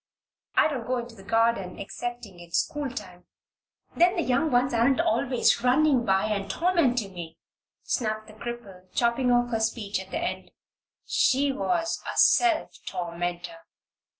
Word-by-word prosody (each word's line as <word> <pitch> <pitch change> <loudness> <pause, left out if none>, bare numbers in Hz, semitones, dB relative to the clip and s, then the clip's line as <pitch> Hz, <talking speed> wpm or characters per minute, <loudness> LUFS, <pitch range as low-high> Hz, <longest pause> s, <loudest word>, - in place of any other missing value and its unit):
"I - - +5
don't 265 -7 -4
go 255 0 0
into 240 -1 -6
the 210 - -14
garden 225 -3 +1
excepting 225 -2 -6
in 175 0 -12
schooltime. 210 - -3 0.7
Then 355 +3 +4
the 340 - 0
young 270 +5 +1
ones 250 0 +2
aren't 245 +5 +3
always 280 -7 +2
running 260 0 +3
by 190 -1 +2
and 200 -2 -2
tormenting 250 - +1
me," 165 -2 -8 0.5
snapped 215 -2 -2
the 215 - -14
cripple, 210 -5 -8
chopping 240 +2 +2
off 245 0 +2
her 225 - 0
speech 220 -3 -1
at 190 0 -9
the - - -3
end. 345 +1 -4 0.6
She 275 +2 +2
was 330 +4 -1
a - - -8
self 345 -3 +4 0.2
tormentor. 175 - -4
240 Hz, 150 wpm, -26 LUFS, 195-275 Hz, 0.7 s, I